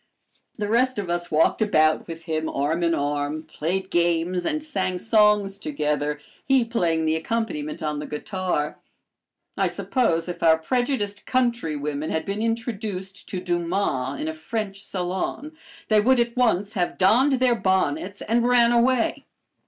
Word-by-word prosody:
The 210 -2 -2
rest 250 +4 +2
of 190 -4 -2
us 175 0 -2
walked 160 +7 +2
about 155 -7 +3
with 165 -1 -8
him, 160 -1 -2
arm 150 +5 -1
in 170 -1 +2
arm, 145 +2 -2
played 185 +6 -3
games, 175 +1 +1
and 310 -1 -1
sang 190 -12 -2
songs 210 -2 +3
together, 150 -2 -1 0.2
he 265 -3 +3
playing 170 -9 0
the 160 0 +2
accompaniment 160 -5 -3
on 150 -1 -2
the 150 - -6
guitar. 155 -1 -3 0.8
I - - +2
suppose 185 -11 0
if 175 - -6
our 160 -1 +5
prejudiced 210 - -2
countrywomen 155 - -1
had 160 - -2
been 200 +2 -3
introduced 220 -4 -4
to 185 - -3
Dumas 175 -7 -1
in - - -3
a 160 - -2
French 195 +5 -4
salon, 190 - -4 0.3
they 215 -1 +4
would 255 +3 +4
at 235 0 0
once 215 -5 +1
have 180 -3 -1
donned 240 +9 +4
their 255 -1 +3
bonnets 190 -3 0
and 235 +2 +1
ran 240 -1 +5
away. 240 0 +2
185 Hz, 150 wpm, -24 LUFS, 160-230 Hz, 0.8 s, our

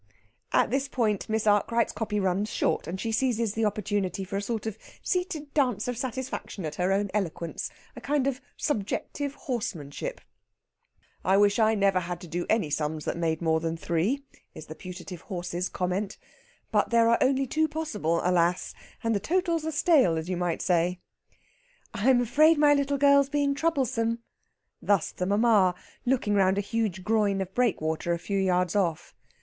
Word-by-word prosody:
At - - +3
this 270 +1 0
point 220 -7 -1
Miss 220 0 0
Arkwright's 215 +3 +2
copy 210 -1 -2
runs 195 +2 0
short, - - 0
and 185 +3 -4
she 225 +3 -2
seizes 230 -2 +1
the 225 0 0
opportunity 205 -2 -1
for 190 +1 -6
a 200 - 0
sort 225 +1 -3
of 220 -3 -3 0.3
seated 360 -6 -2
dance 250 -8 +1
of 245 - -1
satisfaction 255 - -4
at 155 - -4
her 180 +4 0
own 200 0 0
eloquence 170 -5 -3 0.3
a - - -9
kind 285 -1 0
of 275 -1 -1 0.2
subjective 280 +3 -2
horsemanship. 210 - -4 1.0
"I 190 +2 +3
wish 205 +2 +4
I 220 0 +4
never 195 -2 +3
had 175 -1 -5
to 175 - -9
do 175 +2 -3
any 210 -9 +1
sums 150 +1 -2
that - - -1
made 165 -1 -1
more 160 -1 +2
than 165 0 -3
three," 185 - 0 0.3
is 155 - -9
the 155 - -8
putative 180 0 -9
horse's 180 -2 -4
comment. 185 +3 -2 0.5
"But - - +2
there 230 -1 +4
are 235 - +4
only 270 0 +3
two 315 +4 +1
possible, 230 - -1
alas! 180 0 +1 0.3
And 230 0 +1
the 205 - +1
totals 335 - 0
are - - -1
stale, 290 - +4
as 160 +1 -4
you 185 - 0
might 175 -1 -1
say." 180 0 +1 0.9
"I'm 245 +4 +3
afraid 300 +7 +4
my 295 0 +6
little 280 0 +1
girl's 280 0 +5
being 285 -1 +1
troublesome." 245 -7 0 0.6
Thus 200 -5 +1
the 180 - -3
mamma, 205 -3 +4 0.3
looking 240 -5 +1
round 190 -1 +3
a - - +2
huge 205 -3 -2
groin 210 -2 +2
of 190 0 -4
breakwater 175 -8 0
a - - 0
few 195 +3 -2
yards 180 -1 +1
off. 170 -6 0
205 Hz, 175 wpm, -27 LUFS, 180-255 Hz, 1.0 s, my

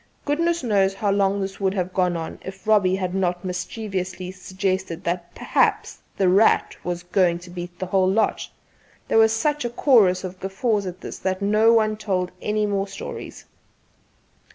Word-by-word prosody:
Goodness 335 +2 0
knows 195 -4 +2
how 200 0 0
long 200 0 +1
this 195 0 -5
would 195 0 0
have 185 -1 -2
gone 180 -2 +1
on 165 -1 -6
if 190 +2 -9
Robbie 200 -4 +4
had 185 -2 -3
not 180 -1 -1
mischievously 185 -1 -4
suggested 185 -2 -3
that 175 0 -3
"perhaps - - 0 0.2
'The 190 - +2
Rat' 195 +5 +4
was 175 0 -3
going 180 -1 +2
to 175 0 -12
beat 175 0 -7
the 185 - -3
whole 185 0 +2
lot." 220 +4 0 0.6
There - - +4
was 220 0 +6
such 295 +6 0
a 240 - -1
chorus 215 -8 +4
of 185 0 -7
guffaws 200 +1 -1
at 180 0 -7
this - - -7
that 190 +1 -2
no 215 +3 +4
one 215 -2 +3
told 185 -4 -1
any 210 0 0
more 200 -1 -1
stories. - - -8
190 Hz, 175 wpm, -23 LUFS, 180-210 Hz, 0.6 s, was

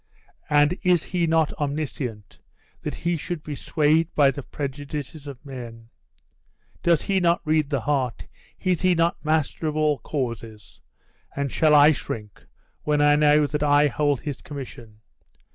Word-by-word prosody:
And 150 +4 +3
is 180 -4 +3
he 175 -2 -1
not 160 -1 +2
omniscient, 140 -7 -4 0.4
that - - -4
he 175 0 -1
should 165 0 -5
be 150 - -5
swayed 155 +3 +2
by 140 -2 +5
the 140 - -6
prejudices 145 +1 -6
of 140 0 -10
men? 115 -4 -9 0.9
Does 170 -2 +3
he 195 -1 +1
not 170 -1 +3
read 155 -2 +1
the 140 -4 -1
heart? 130 -3 -1 0.3
Is 180 -3 0
he 185 -1 +3
not 165 +1 0
master 155 0 0
of 150 - -2
all 150 -2 +2
causes? 115 -6 -5 0.5
And 140 -2 -2
shall 155 -1 +4
I 145 +1 +8
shrink 105 -7 -6 0.3
when 150 -1 0
I 145 0 +5
know 150 0 +4
that 150 +1 -3
I 145 0 +4
hold 145 -1 0
his 145 -4 -5
commission? 115 -6 -9
145 Hz, 155 wpm, -24 LUFS, 135-155 Hz, 0.9 s, I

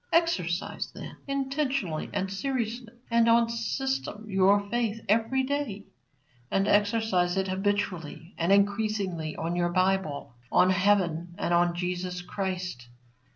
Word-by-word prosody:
Exercise, 185 - 0
then, - - -8
intentionally 270 - -1
and 195 0 -2
seriously 240 0 -3 0.2
and 230 0 +4
on 230 0 +5
system 230 -1 -2
your 200 +1 +3
faith 230 -2 0
every 230 +5 +2
day. 260 -7 -2 0.6
And 195 +1 +1
exercise 205 -4 +2
it 190 0 +1
habitually 190 -4 -2
and 170 +3 0
increasingly 200 -5 +1
on 165 +2 -2
your 175 0 +1
Bible, 185 -7 0 0.2
on 185 +1 +5
heaven, 180 -3 +1
and 175 - 0
on 175 0 +3
Jesus 180 0 -3
Christ. 180 -9 -4
195 Hz, 120 wpm, -28 LUFS, 180-230 Hz, 0.6 s, on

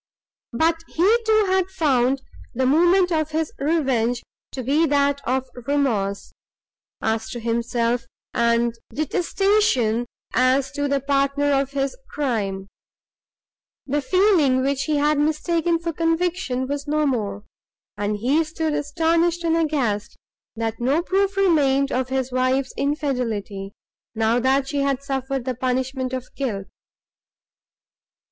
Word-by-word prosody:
But 325 +6 +1
he, 380 +7 +3
too, 435 -1 +4
had 375 -1 +1
found 275 -7 +1 0.3
the 260 +2 +1
moment 350 +6 +4
of 310 -2 0
his 315 0 -2
revenge 265 -6 +1 0.3
to 260 - -5
be 295 +6 +2
that 280 -1 +2
of 260 +1 0 0.2
remorse, 215 -9 0 0.7
as 220 0 -1
to 240 - -5
himself, 235 +1 -1 0.3
and 235 0 +2 0.2
detestation, 305 - +1 0.3
as 260 +1 +2
to 285 0 -2
the 280 -1 0
partner 275 +1 +1
of 275 0 +1
his 275 -1 -1
crime; 205 -9 -2 1.2
the 290 +2 0
feeling, 310 -6 +3
which 275 0 0
he 310 - 0
had 295 +1 +2
mistaken 330 +3 +1
for 335 0 -4
conviction, 330 -5 0
was 285 +1 -4
no 305 +1 +1
more; 205 -7 -2 0.5
and 205 +1 -2
he 270 +9 +2
stood 315 0 -2
astonished, 330 +4 +1
and 330 -1 +2
aghast, 275 -11 -1 0.4
that 225 0 -3
no 275 +7 +1
proof 390 +1 0
remained 280 -7 +3
of 255 0 -1
his 265 -1 -1
wife's 255 +1 0
infidelity, 245 -9 -2 0.4
now 225 +2 +2
that 265 +2 +2
she 285 +1 -2
had 275 -1 0
suffered 270 -2 -3
the 260 - -1
punishment 255 +1 -2
of 255 -1 -4
guilt. 215 -8 -3
275 Hz, 130 wpm, -22 LUFS, 245-315 Hz, 1.2 s, too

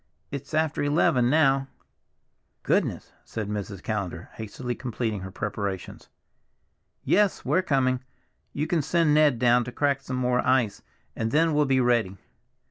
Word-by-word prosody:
"It's 140 +2 -5
after 155 -1 +1
eleven 145 -4 +3
now." 135 -2 +3 1.0
"Goodness!" - - 0
said 110 -2 -5
Mrs. 100 -2 -5
Callender, 95 -6 -4
hastily 120 +3 -5
completing 115 -4 -3
her 95 0 -7
preparations. 100 -1 -5 0.9
"Yes! 205 -1 +2
we're 150 +8 +2
coming. 130 -6 +1 0.5
You 150 - -2
can 165 -1 +1
send 165 +1 +2
Ned 150 -4 +4
down 120 0 +4
now - - -4
to 125 - -6
crack 140 -2 +1
some 130 -1 -4
more 125 0 +1
ice, 125 -5 +1 0.3
and 110 - -1
then 160 +4 +2
we'll 150 0 +3
be 135 -1 +2
ready." 120 -6 +1
130 Hz, 145 wpm, -26 LUFS, 110-145 Hz, 1.0 s, Ned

